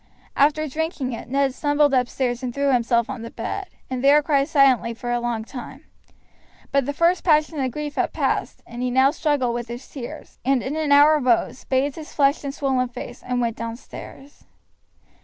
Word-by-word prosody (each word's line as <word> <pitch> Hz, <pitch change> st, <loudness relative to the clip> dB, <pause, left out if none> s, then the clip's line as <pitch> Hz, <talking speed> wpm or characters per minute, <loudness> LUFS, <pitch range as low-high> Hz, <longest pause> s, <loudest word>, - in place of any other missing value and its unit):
After 305 Hz, +2 st, +3 dB
drinking 300 Hz, -3 st, -3 dB
it 230 Hz, -, -7 dB
Ned 275 Hz, 0 st, +1 dB
stumbled 290 Hz, 0 st, +2 dB
upstairs 250 Hz, -1 st, 0 dB
and 250 Hz, -2 st, -3 dB
threw 280 Hz, +2 st, +1 dB
himself 235 Hz, -1 st, +2 dB
on 260 Hz, -3 st, -6 dB
the 230 Hz, -, -6 dB
bed, 380 Hz, +13 st, -5 dB, 0.2 s
and 255 Hz, 0 st, -4 dB
there 290 Hz, +2 st, +6 dB
cried 280 Hz, -2 st, +2 dB
silently 270 Hz, -7 st, +3 dB
for 240 Hz, +1 st, -5 dB
a 240 Hz, -, +1 dB
long 240 Hz, -2 st, -2 dB
time; 265 Hz, +4 st, -9 dB, 0.9 s
but 275 Hz, -2 st, +1 dB
the -, -, 0 dB
first 340 Hz, +5 st, +2 dB
passion 305 Hz, -2 st, +2 dB
of 260 Hz, -1 st, 0 dB
grief 295 Hz, +3 st, -5 dB
had -, -, 0 dB
passed, -, -, -2 dB
and 240 Hz, +1 st, -8 dB
he 250 Hz, -, 0 dB
now 260 Hz, +2 st, +4 dB
struggled 290 Hz, -6 st, 0 dB
with 240 Hz, 0 st, -4 dB
his 240 Hz, +3 st, -8 dB
tears, 250 Hz, -4 st, -9 dB
and 265 Hz, -1 st, +2 dB
in 275 Hz, +3 st, -3 dB
an 310 Hz, -2 st, -1 dB
hour 295 Hz, +2 st, +7 dB
rose, 250 Hz, -1 st, +1 dB
bathed 270 Hz, +2 st, 0 dB
his 310 Hz, -1 st, -9 dB
flushed 280 Hz, 0 st, +2 dB
and 280 Hz, 0 st, -4 dB
swollen 265 Hz, -3 st, 0 dB
face, 245 Hz, 0 st, -9 dB
and 250 Hz, 0 st, -2 dB
went 230 Hz, -2 st, -1 dB
downstairs. 235 Hz, +4 st, -9 dB
270 Hz, 195 wpm, -23 LUFS, 245-290 Hz, 0.9 s, hour